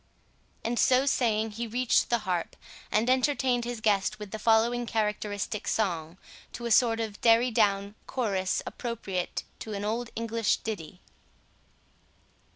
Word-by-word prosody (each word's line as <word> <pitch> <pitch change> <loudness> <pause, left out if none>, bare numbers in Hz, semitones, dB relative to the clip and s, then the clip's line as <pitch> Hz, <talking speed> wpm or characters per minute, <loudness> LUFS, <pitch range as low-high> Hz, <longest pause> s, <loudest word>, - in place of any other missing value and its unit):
And 235 +1 0
so 255 +1 +4
saying, 225 -5 +1
he 230 +3 -4
reached 245 +2 +2
the 235 - +3
harp, 180 -2 -2 0.4
and 220 +3 +2
entertained 255 -2 +2
his 240 -2 -5
guest 200 -3 +1
with 210 -2 -8
the 220 - -5
following 230 +2 +3
characteristic 210 -1 -2
song, 170 -5 -1 0.4
to 235 - -6
a 235 - -2
sort 225 +1 +4
of 220 -3 -4
derry 235 +2 +5
down 200 -2 +2
chorus, 195 -7 -1
appropriate 205 -7 -4 0.2
to 220 - -6
an 200 0 -3
old 230 +3 -2
English 230 -1 0
ditty. 190 -4 -6
220 Hz, 140 wpm, -28 LUFS, 205-235 Hz, 0.4 s, derry